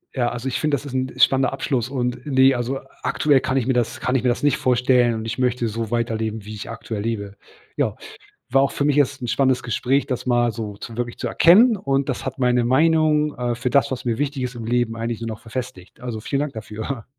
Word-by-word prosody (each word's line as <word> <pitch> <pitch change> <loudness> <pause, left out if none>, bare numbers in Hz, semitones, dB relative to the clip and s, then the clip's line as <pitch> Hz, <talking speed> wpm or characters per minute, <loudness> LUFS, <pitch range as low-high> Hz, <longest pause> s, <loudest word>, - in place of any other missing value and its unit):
Ja 120 -3 +1
also, 120 +2 -5
ich 130 - -1
finde, 155 -2 +1
das 145 - -6
ist 140 - -7
'n 130 0 -1
spannender 130 0 +4
Abschluss. 125 -4 -1
Und 125 -2 -2
ne 135 -2 +5
also, 125 +2 -2 0.2
aktuell 145 -3 +3
kann 130 +1 -1
ich 125 - +1
mir 130 - +1
das 120 -2 -1
kann 125 - -1
ich 130 - +2
mir 125 - +3
das 120 - -1
nicht 145 0 +3
vorstellen. 125 -3 +3
Und 110 0 -5
ich 115 +1 -4
möchte 125 -2 +1
so 115 0 -3
weiterleben, 110 -2 -2
wie 110 - -7
ich 105 0 -7
aktuell 115 -2 -5
lebe. 100 -2 -3 0.4
Ja, - - 0 0.6
war 135 +2 +4
auch 140 - +1
für 145 - -1
mich 145 -1 +2
jetzt 140 -1 +2
'n 120 - -4
spannendes 130 0 +2
Gespräch, 125 +4 0
das 125 -3 -3
mal 120 -1 +2
so 110 -3 -6
zu 115 +1 -8
wirklich 120 -1 -4
zu - - -2
erkennen. 215 +8 +6
Und 135 -6 -1
das 130 - -3
hat - - -5
meine 125 -1 +2
Meinung, 150 +3 +3
äh, 120 -1 -1
für 120 +2 -2
das, 140 +1 +3
was 130 -1 -5
mir 115 - +1
wichtig 140 0 -2
ist 125 - -4
im 115 -2 -7
Leben 120 0 0
eigentlich 115 0 -3
nur 115 - -4
noch 110 0 -6
verfestigt. 115 -6 -7
Also 120 -3 -5
vielen 140 +5 -2
Dank 145 -2 -3
dafür. 110 +2 -6
125 Hz, 245 wpm, -22 LUFS, 115-135 Hz, 0.6 s, erkennen